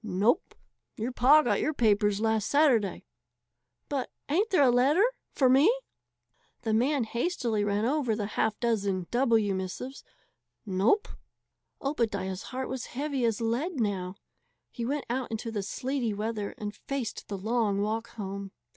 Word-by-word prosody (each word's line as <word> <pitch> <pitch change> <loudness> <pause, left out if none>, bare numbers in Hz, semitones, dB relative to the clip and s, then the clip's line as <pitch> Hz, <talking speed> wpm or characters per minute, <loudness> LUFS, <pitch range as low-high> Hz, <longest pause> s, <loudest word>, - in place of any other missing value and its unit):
"Nope; 220 - +1 0.4
your 230 +4 -2
pa 275 +5 +6
got 245 - +1
your 310 - 0
papers 205 -3 +3
last 220 -1 +1
Saturday." 255 - +3 0.8
"But 275 -3 -2 0.2
ain't 390 +9 +2
there 360 -7 +4
a 255 - +5
letter 280 - +4 0.3
for 265 - +4
me?" 275 - +6 0.9
The 220 -2 0
man 260 +4 +2
hastily 235 -3 -1
ran 205 +1 0
over 260 -4 +1
the 210 -1 -2
half 215 +1 -1
dozen 200 -6 0
"W" 230 -5 +3
missives. 190 +8 -5 0.6
"Nope." 205 - +2 0.8
Obadiah's 200 -9 -1
heart 260 0 -3
was 260 -2 -4
heavy 280 -3 0
as 225 -1 0
lead 260 +8 -1
now. 195 -4 -1 0.6
He 240 - -5
went 285 +4 -2
out 250 +2 -2
into 225 +1 -4
the 210 -2 -2
sleety 240 +2 -2
weather 210 -1 -3
and 210 -1 -5
faced 260 +2 -5
the 200 - -4
long 215 0 0
walk 220 +3 -1
home. 195 -2 -6
230 Hz, 145 wpm, -29 LUFS, 205-265 Hz, 0.9 s, pa